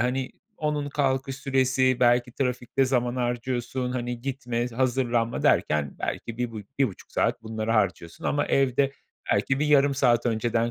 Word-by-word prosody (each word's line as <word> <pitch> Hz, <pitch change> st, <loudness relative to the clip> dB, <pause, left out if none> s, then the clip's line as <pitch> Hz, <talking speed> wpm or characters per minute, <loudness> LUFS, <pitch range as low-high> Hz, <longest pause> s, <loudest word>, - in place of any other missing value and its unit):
hani, 130 Hz, +2 st, -1 dB, 0.2 s
onun 150 Hz, -2 st, -1 dB
kalkış 135 Hz, -2 st, 0 dB
süresi 130 Hz, -1 st, +2 dB
belki 120 Hz, 0 st, +3 dB
trafikte 125 Hz, 0 st, 0 dB
zaman 125 Hz, -1 st, 0 dB
harcıyorsun. 125 Hz, +1 st, -2 dB
Hani, 120 Hz, -1 st, -3 dB
gitme, 125 Hz, -2 st, -2 dB
hazırlanma 120 Hz, -1 st, 0 dB
derken 75 Hz, -2 st, +2 dB
belki 115 Hz, -1 st, -4 dB
bir 125 Hz, -1 st, -1 dB
bu 110 Hz, -2 st, -6 dB, 0.2 s
1.5 125 Hz, -9 st, -1 dB
saat -, -, 0 dB
bunlara 110 Hz, 0 st, -2 dB
harcıyorsun 85 Hz, -5 st, -1 dB
ama 145 Hz, 0 st, +1 dB
evde 135 Hz, 0 st, +2 dB, 0.4 s
belki 135 Hz, 0 st, +1 dB
bir 150 Hz, -, +1 dB
yarım 140 Hz, -1 st, +4 dB
saat 125 Hz, -3 st, +3 dB
önceden 115 Hz, +1 st, 0 dB
125 Hz, 145 wpm, -26 LUFS, 120-135 Hz, 0.4 s, yarım